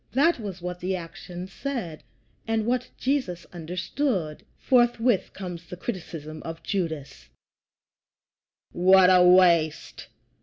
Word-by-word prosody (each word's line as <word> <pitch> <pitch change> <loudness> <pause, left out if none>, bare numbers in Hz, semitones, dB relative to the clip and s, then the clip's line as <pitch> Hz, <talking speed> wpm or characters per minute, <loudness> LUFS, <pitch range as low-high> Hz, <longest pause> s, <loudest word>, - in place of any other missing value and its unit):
That 295 +4 +3
was 190 -5 -7
what 180 0 -4
the 185 +2 -2
action 175 +1 -8
said, 190 - -5 0.5
and 225 -1 0
what 250 +2 -1
Jesus 255 -10 -1
understood. 180 - -3
Forthwith 240 -3 +2
comes 175 -3 -7
the 180 - -8
criticism 160 -7 -6
of 165 0 -8
Judas: 160 -8 -4 1.4
"What 185 +1 +6
a 180 -1 +6
waste! 175 -4 +3
180 Hz, 110 wpm, -25 LUFS, 170-225 Hz, 1.4 s, What